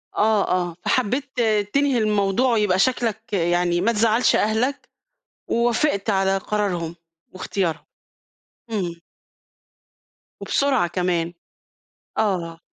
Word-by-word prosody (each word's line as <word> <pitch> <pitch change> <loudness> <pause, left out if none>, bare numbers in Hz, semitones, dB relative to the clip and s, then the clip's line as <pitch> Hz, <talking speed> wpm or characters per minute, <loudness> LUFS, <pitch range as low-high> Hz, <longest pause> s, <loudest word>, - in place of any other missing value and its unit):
آه، 215 -1 +2 0.2
آه، 170 - -11
فحبيت 260 +2 0 0.3
تنهي 280 -2 +2
الموضوع 215 +3 +2
ويبقى 205 -4 +2
شكلك 225 0 0
يعني 175 -1 +1
ما 230 +4 +2
تزعّلش 225 +2 +3
أهلك 225 +6 0 0.6
ووافقت 235 -2 +1
على 195 -1 +2
قرارهم 185 -5 -2 0.4
وإختيارهم. 185 -2 -3 0.9
امم. 175 -6 -3 1.4
وبسرعة 275 -10 +1
كمان. 175 -1 -1 0.8
آه. 170 -6 -1
205 Hz, 90 wpm, -22 LUFS, 180-235 Hz, 1.4 s, تزعّلش